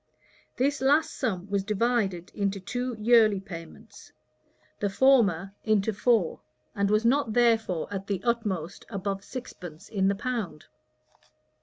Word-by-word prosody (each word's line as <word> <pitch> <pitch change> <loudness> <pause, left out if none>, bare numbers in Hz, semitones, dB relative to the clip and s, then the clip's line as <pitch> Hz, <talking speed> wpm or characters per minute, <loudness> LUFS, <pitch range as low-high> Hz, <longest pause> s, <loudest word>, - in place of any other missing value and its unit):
This 280 +3 +1
last 290 +4 +3
sum 190 -8 -2
was 200 -1 -1
divided 205 -4 0
into 200 -1 -1
two 245 +6 -3
yearly 215 -2 +4
payments; 190 +3 -11 0.7
the 205 - 0
former 195 -7 +3
into 215 0 +1
four, 210 -4 +1 0.3
and 200 0 0
was 215 +2 +2
not 250 -2 +2
therefore 225 -8 +2
at 195 0 -5
the 200 -3 -1
utmost 210 -8 -2
above 200 -2 -3
sixpence 180 - -9
in 195 -3 +1
the 200 - +2
pound. 205 -9 -4
210 Hz, 130 wpm, -27 LUFS, 195-235 Hz, 0.7 s, yearly